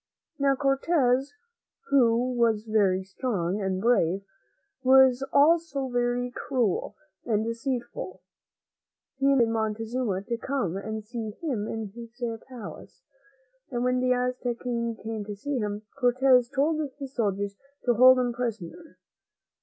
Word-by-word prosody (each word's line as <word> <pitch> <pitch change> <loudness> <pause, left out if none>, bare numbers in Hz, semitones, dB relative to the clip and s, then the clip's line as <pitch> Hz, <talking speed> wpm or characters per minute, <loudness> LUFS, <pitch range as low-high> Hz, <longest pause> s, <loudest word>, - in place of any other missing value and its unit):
Now, 275 -1 +3
Cortez, 275 +1 +1 0.6
who 245 -2 +3
was 230 -3 +2
very 200 -4 +2
strong 190 -2 -2
and 190 -1 -1
brave, 195 -4 +2 0.6
was 260 -1 +6
also 290 -2 +3
very 245 0 0
cruel 245 -6 -1 0.3
and 220 -2 0
deceitful. 240 +1 -4 1.0
He 275 - +2
invited 260 -5 +4
Montezuma 220 -1 -2
to 235 +3 -3
come 240 -8 -2
and 220 +2 -4
see 220 -2 -6
him 245 -11 -2
in 225 -2 -4
his 235 +1 -11 0.3
palace, 245 -5 -10 0.7
and 240 -1 -2
when 250 0 +2
the 255 0 +1
Aztec 250 -1 -1
King 235 -2 -2
came 220 -1 -5
to 205 0 -6
see 275 +6 -3
him, 210 -1 -3
Cortez 250 -1 +4
told 300 +4 +1 0.2
his 275 -2 -7
soldiers 200 -4 -1 0.3
to 245 - +4
hold 255 +3 +7
him 245 -1 0
prisoner. 235 - -5
240 Hz, 130 wpm, -27 LUFS, 220-260 Hz, 1.0 s, hold